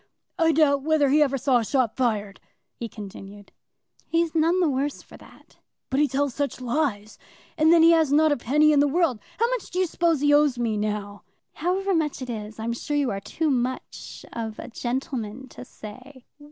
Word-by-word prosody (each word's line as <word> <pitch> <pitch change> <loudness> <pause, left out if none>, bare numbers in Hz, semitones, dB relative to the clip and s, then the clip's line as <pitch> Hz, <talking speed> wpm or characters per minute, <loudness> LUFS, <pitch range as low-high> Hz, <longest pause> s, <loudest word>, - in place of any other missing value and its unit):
"I 325 -1 +4
doubt 290 -3 +3
whether 300 -1 +2
he 300 +3 +4
ever 275 -2 +2
saw 260 0 +2
a - - -2
shot 250 -1 0
fired," 210 -6 -1 0.3
he 235 - -7
continued. 200 0 -11 0.6
"He's 335 -1 0
none 330 +3 +2
the 355 - +3
worse 280 +1 -2
for - - -15
that." - - -19 0.3
"But 265 - +1
he 300 - +4
tells 275 -1 -1
such 285 0 -3
lies; 240 -5 -2 0.4
and 315 0 +4
then 335 -1 +6
he 330 - +7
has 320 -4 +3
not 310 +1 +4
a 290 - +1
penny 300 +6 +3
in 290 - +4
the 290 - +4
world. 305 -6 +1 0.2
How 465 - +2
much - - -3
do 360 - -6
you 370 - +3
suppose 335 -3 0
he 290 0 +4
owes 290 -3 +4
me, 230 -2 -1
now?" 210 -1 -3 0.3
"However 380 +4 -1
much 315 -4 0
it 250 - -5
is, 215 -1 -7
I'm 225 +1 -3
sure 290 +5 -3
you 275 -5 +1
are 195 - -3
too 310 +8 -1
much 255 0 -4
of 225 -2 -5
a - - -8
gentleman 245 0 -4
to - - -10
say." 255 +3 -12
275 Hz, 205 wpm, -24 LUFS, 235-310 Hz, 0.6 s, he